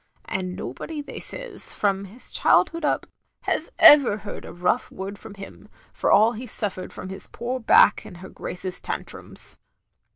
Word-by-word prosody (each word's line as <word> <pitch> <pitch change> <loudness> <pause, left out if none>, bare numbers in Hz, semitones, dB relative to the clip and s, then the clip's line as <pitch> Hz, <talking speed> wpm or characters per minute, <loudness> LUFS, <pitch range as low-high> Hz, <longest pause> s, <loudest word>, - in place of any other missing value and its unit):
And 185 -1 -3
nobody 295 - -6
they - - -8
says, - - -2
from 200 -1 0
his 215 +6 -7
childhood 335 -1 +3
up 295 - 0 0.2
— - - -32
^has - - 0
ever 275 -8 +8
heard 210 -1 -8
a - - -8
rough 180 +1 0
word 195 +1 -7
from 200 - -11
him, 200 +1 -11 0.2
for - - 0
all 215 +3 +6
he 245 +2 -7
suffered 200 -4 -3
from 185 - -8
his 190 - -4
poor 250 +2 -4
back 220 -2 +5
and 175 - -11
her 190 +2 -10
Grace's 180 0 -6
tantrums. - - -5
205 Hz, 170 wpm, -24 LUFS, 190-245 Hz, 0.2 s, ever